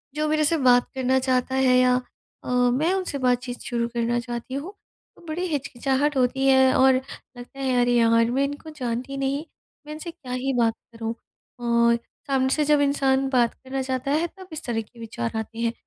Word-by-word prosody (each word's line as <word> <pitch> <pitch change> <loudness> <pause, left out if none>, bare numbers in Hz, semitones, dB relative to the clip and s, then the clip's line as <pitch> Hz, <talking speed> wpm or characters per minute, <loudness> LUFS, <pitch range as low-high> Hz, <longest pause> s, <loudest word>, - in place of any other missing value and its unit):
जो 305 0 0
मेरे 310 0 +2
से 330 +2 +2
बात 245 -3 +4
करना 260 0 +1
चाहता 260 0 0
है 255 -1 +4
या 250 0 +4 0.5
अ, - - -7
मैं 250 +8 +2
उनसे 370 -7 -2
बातचीत 250 -1 -1
शुरू 235 -1 -2
करना 235 0 0
चाहती 240 +1 -6
हूँ 315 +9 -5 0.4
तो - - -19
बड़ी 335 +3 -3
हिचकिचाहट 275 0 -1
होती 265 +2 +1
है 265 -1 +5
और 265 0 +6
लगता 260 0 -8
है 255 -2 +1
अरे, 245 0 +2
यार 230 0 +4
मैं 270 +2 +1
इनको 290 +3 -5
जानती 255 -1 -4
नहीं, 275 +3 -1 0.4
मैं 300 - -7
इनसे 325 +2 -7
क्या 285 -8 -11
ही 265 +2 -1
बात 230 -2 +2 0.2
करूँ? 225 0 -4 0.5
और 235 0 +3 0.3
सामने 265 -1 +1
से 300 +2 +2
जब 295 -1 +4
इंसान 270 -1 +2
बात 245 -3 +2
करना 265 0 -5
चाहता 260 +1 -2
है 320 +3 +1
तब 375 -1 -11
इस 310 - -5
तरह 230 -2 -1
के 230 +2 -17
विचार 165 - -4
आते 225 +1 -5
हैं। 230 0 0
260 Hz, 195 wpm, -24 LUFS, 245-280 Hz, 0.5 s, और